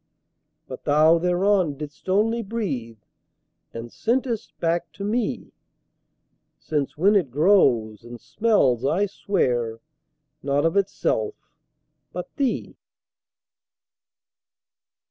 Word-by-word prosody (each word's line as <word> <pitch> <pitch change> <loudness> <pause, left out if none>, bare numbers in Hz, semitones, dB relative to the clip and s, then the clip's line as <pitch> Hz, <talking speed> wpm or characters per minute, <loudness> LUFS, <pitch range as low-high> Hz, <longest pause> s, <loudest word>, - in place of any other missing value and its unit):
But - - -9
thou 155 +3 +5
thereon 180 -3 +1
didst 150 +4 -9
only 225 +5 +2
breathe, 165 - -4 0.7
And 115 0 -8
sent'st 235 -1 -2
back 170 0 -1
to 200 - -8
me: 225 +4 -2 1.0
Since 145 -3 -3
when 200 +6 +4
it 180 -9 +2
grows, 125 - +3
and 120 0 -10
smells, 140 - +1
I 170 +9 +2
swear, 120 - -1 0.6
Not 140 +2 0
of 165 - +1
itself, 190 - 0 0.8
but 180 0 -7
thee. 270 -4 -2
170 Hz, 95 wpm, -24 LUFS, 135-205 Hz, 1.0 s, thou